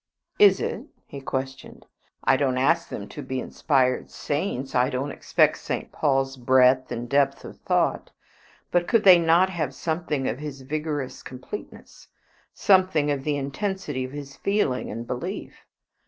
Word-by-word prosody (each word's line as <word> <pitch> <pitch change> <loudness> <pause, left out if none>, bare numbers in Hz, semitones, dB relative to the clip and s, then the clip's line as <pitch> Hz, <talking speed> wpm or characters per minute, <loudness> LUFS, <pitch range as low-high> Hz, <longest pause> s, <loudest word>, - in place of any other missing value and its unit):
"Is 415 -1 +7
it?" - - -4 0.2
he 140 - -9
questioned. 135 0 -5 0.4
"I 135 - +4
don't 130 -2 0
ask 130 +2 +2
them 100 - -6
to 150 - -8
be 130 -1 -4
inspired 130 -1 0
saints. 145 -3 -3
I 125 +1 +3
don't 135 +1 -3
expect - - +2
St. - - -4
Paul's 135 -2 0
breadth 130 +1 +4
and 120 +1 -4
depth 140 +1 +1
of - - -11
thought. - - 0 0.6
But 175 0 +2
could 230 -3 +3
they 185 -3 +9
not 170 +3 +4
have 155 -7 -3
something 160 -5 -2
of - - -3
his 145 -2 -7
vigorous 145 -1 -4
completeness, 130 +11 -10 0.4
something 185 -6 +3
of 140 -2 -2
the 150 -1 0
intensity 145 0 -3
of 130 - -6
his 140 -1 -8
feeling 200 -11 0
and 115 +2 -5
belief? 150 - -6
140 Hz, 155 wpm, -25 LUFS, 130-165 Hz, 0.6 s, they